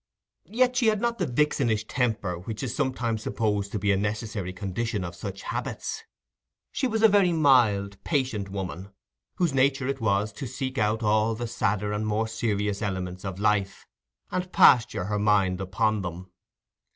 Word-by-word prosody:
Yet 250 +3 +2
she 245 -4 +3
had 215 -2 +3
not 235 0 -1
the 180 - 0
vixenish 120 -5 +1
temper 110 -8 -1
which 105 +5 -6
is 125 -1 -3
sometimes 120 -6 -1
supposed 105 -3 -1
to - - -2
be 100 0 +1
a - - +3
necessary 105 -2 -3
condition 100 +2 -3
of 85 -1 -5
such 95 +2 -7
habits: - - -4 0.7
she 265 - 0
was 220 -2 -1
a - - +10
very 200 -4 +4
mild, 115 -11 +3
patient 130 -10 -1
woman, 95 -1 -5 0.5
whose 170 -5 +1
nature 135 0 +2
it 135 -2 -3
was 105 -1 +1
to 130 - -6
seek 130 +1 -4
out 110 +2 +1
all 110 +1 +2
the 120 +2 -4
sadder 105 -2 -1
and 105 +1 -2
more 110 +1 0
serious 105 -2 -1
elements 90 -3 -3
of 95 -1 -5
life, 105 -2 0 0.5
and 180 0 -3
pasture 115 -7 +5
her 105 +1 -1
mind 100 -3 +2
upon 105 +3 0
them. 90 +1 -7
110 Hz, 170 wpm, -26 LUFS, 100-130 Hz, 0.7 s, a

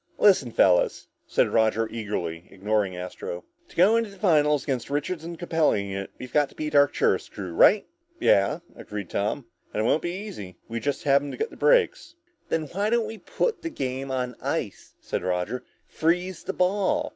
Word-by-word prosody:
"Listen, 185 -12 +5
fellas," 95 -5 +3 0.2
said - - +2
Roger 110 0 +2
eagerly, 90 -7 -4
ignoring 100 -1 -1
Astro, 90 -1 -6 0.3
"to - - -17
go 190 +6 +5
into 230 -2 0
the 200 - -14
finals 150 -7 +3
against 130 -5 -2
Richards 150 +4 -2
and 170 +1 -6
the - - -16
Capella 165 -6 +2
unit, 100 -1 -4
we've 125 - -9
got 145 -2 +3
to - - -19
beat 150 -1 -3
the 145 - +6
Arcturus 145 0 +2
crew, 95 -4 -7
right?" 205 - +5 0.3
"Yeah," 100 - +3
agreed 105 -4 -7
Tom, 105 +7 -1 0.3
"and 110 - -1
it - - 0
won't 150 - +3
be 175 - -2
easy. 175 - -7
We 115 0 -3
just 140 +2 -2
happened 140 0 +2
to - - -7
get 445 - -2
the - - -11
breaks." 480 -7 +2 0.3
"Then 160 - 0
why 200 +4 -1
don't 235 0 +2
we 220 0 -7
put 475 - -1
the 330 - -3
game 135 - -4
on 125 -1 -2
ice?" - - -4
said - - -3
Roger. 90 +7 -2 0.2
"Freeze 180 +3 -1
the - - -1
ball! 210 +13 +1
140 Hz, 190 wpm, -26 LUFS, -, 0.3 s, the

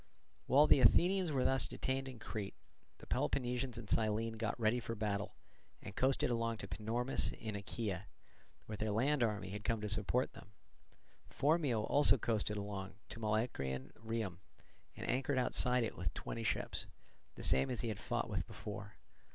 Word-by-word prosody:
While 145 +3 +7
the 145 - +6
Athenians 175 - +5
were 130 -3 +1
thus 135 0 +3
detained 135 0 -2
in 130 -2 -8
Crete, 110 -3 -5 0.4
the - - -13
Peloponnesians 125 -2 -1
in 120 - -6
Cyllene 110 +2 +1
got 110 +1 -2
ready 115 +2 +2
for 115 -1 -4
battle, 105 -1 -2 0.4
and 100 - -9
coasted 130 -1 +3
along 115 -1 0
to - - -6
Panormus 120 +4 0
in 110 -3 -5
Achaea, 100 -1 -3 0.6
where 110 - -5
their 110 +1 -1
land 130 +7 +2
army 105 -5 0
had 105 +2 -6
come 115 -1 0
to 105 - -3
support 105 +5 +2
them. 100 - -14 0.8
Phormio 145 -7 +2
also 145 +6 +5
coasted 105 -2 0
along 100 -2 -5
to 115 - -7
Molycrian 105 - -1
Rhium, 110 -5 -3 0.6
and - - -5
anchored 130 +3 +1
outside 125 0 +3
it 110 - -3
with 85 -4 -2
twenty 115 - -4
ships, 110 - -2 0.5
the - - -8
same 65 0 +4
as 125 - -2
he 120 - -2
had 105 -2 -4
fought - - -1
with - - -2
before. - - -7
115 Hz, 165 wpm, -36 LUFS, 105-125 Hz, 0.8 s, While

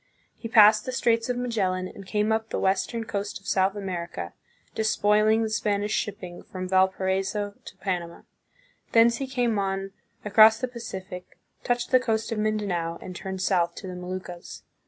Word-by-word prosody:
He 230 - -7
passed 215 -1 +6
the - - -1
Straits 230 -1 +1
of 250 - 0
Magellan, 195 -7 -1
and 195 0 -11
came 210 +3 0
up 220 0 0
the - - -2
western 195 +4 0
coast 205 -2 -4
of 195 - -25
South 190 +1 +2
America, 170 - -5 0.4
despoiling 215 0 +3
the 220 - -1
Spanish 210 -1 0
shipping 190 -5 -4
from 185 -1 -6
Valparaiso 190 +2 +1
to 190 - -11
Panama. 175 -3 -3 0.7
Thence 230 0 +5
he 270 - -4
came 245 -5 0
on 195 0 -2 0.3
across 215 +2 +7
the 255 - -1
Pacific, 190 -6 -8 0.3
touched 245 0 -1
the 255 - +6
coast 225 -3 -1
of 225 - -2
Mindanao, 200 -6 -1
and 185 - -9
turned 190 0 -5
south 175 -3 +1
to - - -8
the 180 - -6
Moluccas. 180 -1 -7
205 Hz, 165 wpm, -26 LUFS, 185-220 Hz, 0.7 s, across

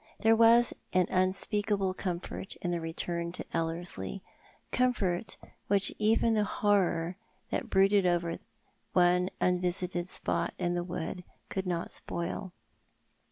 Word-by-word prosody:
There 225 0 +5
was 230 +1 +6 0.2
unspeakable 190 +2 +1
comfort 185 +1 -4
in 175 - -3
the 170 -1 -1
return 170 +1 -3
to - - -6
Ellerslie, 165 - -2 0.5
comfort 215 -7 0 0.3
which 200 0 +3
even 225 +2 +3
the 215 -1 +3
horror 185 -4 +1 0.3
that - - -2
brooded 195 0 +4
over 170 -1 0 0.5
one 180 0 +4
unvisitcd 180 0 0
spot - - -1
in 175 -1 0
the 175 0 -1
wood 175 +1 -5 0.3
could 190 -1 -3
not 170 -1 -2
spoil. 170 +2 -4
180 Hz, 115 wpm, -30 LUFS, 175-200 Hz, 0.5 s, was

